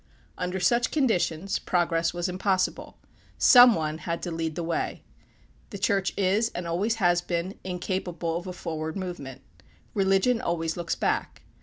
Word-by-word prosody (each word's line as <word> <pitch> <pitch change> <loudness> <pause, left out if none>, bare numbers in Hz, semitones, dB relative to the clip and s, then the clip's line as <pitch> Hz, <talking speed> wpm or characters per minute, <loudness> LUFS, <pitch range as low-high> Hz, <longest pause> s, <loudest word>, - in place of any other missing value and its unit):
Under 180 +1 -3
such 235 +6 +2
conditions 195 - 0
progress 170 -2 +1
was 175 +1 -2
impossible. 185 +1 -1 0.4
Some 245 -3 +8
one 155 0 -2
had 170 +1 -4
to 175 - -3
lead 165 -1 -3
the 170 - -3
way. 165 0 -2 0.7
The 200 - -7
Church 195 0 +1
is, 205 +4 +2
and 175 - -4
always 195 +7 0
has 175 -5 +2
been, 175 +2 -3
incapable 180 -2 -3
of 175 +2 -4
a 180 - -5
forward 160 -3 -5
movement. 175 -9 -6 0.5
Religion 195 +5 +2
always 165 -1 -1
looks 170 -1 -2
back. - - -2
180 Hz, 150 wpm, -26 LUFS, 170-195 Hz, 0.7 s, Some